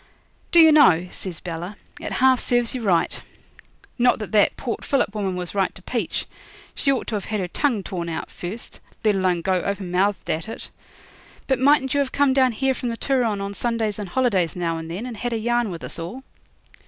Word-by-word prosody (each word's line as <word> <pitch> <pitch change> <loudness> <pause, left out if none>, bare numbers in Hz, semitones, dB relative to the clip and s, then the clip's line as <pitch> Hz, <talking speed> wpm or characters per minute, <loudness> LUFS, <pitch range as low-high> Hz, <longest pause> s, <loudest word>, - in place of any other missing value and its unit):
'Do 340 - +6
you 320 -1 +9
know,' 180 - +6
says 180 -4 -6
Bella, 175 +4 -6 0.2
'it - - -5
half 260 -1 +4
serves 245 -1 +1
you 255 - -3
right. 185 -6 +1 0.8
Not 245 +1 +4
that 215 - -6
that 210 -2 +3
Port 240 -4 -4
Phillip 270 -7 +1
woman 195 -3 -2
was 180 -1 -5
right 195 -2 0
to - - -11
peach. 240 +2 -2 0.5
She 275 - +1
ought 265 - -1
to - - -5
have 205 -2 -2
had 215 -1 -2
her 185 - -2
tongue 230 - 0
torn 170 -3 -4
out 160 - -5
first, 195 +7 -7 0.3
let 210 - +5
alone 185 -3 +1
go 185 -1 +1
open 200 -3 -3
mouthed 195 +3 +1
at 165 +6 -2
it. - - -7 0.7
But 265 -2 +1
mightn't 270 0 +4
you 285 - +2
have 275 -2 0
come 280 -2 +3
down 260 -2 +3
here 265 +4 +1
from 250 -1 -3
the 230 - -4
Turon 235 -7 +1
on 200 0 -4
Sundays 220 0 -1
and 200 -3 -5
holidays 195 -7 +1
now 165 -2 -1
and 160 0 -7
then, 185 +8 -4
and 245 -3 -6
had 245 +2 -2
a - - 0
yarn 240 0 +1
with 170 -3 -7
us - - -6
all?' 195 +11 -6
210 Hz, 215 wpm, -23 LUFS, 180-250 Hz, 0.8 s, you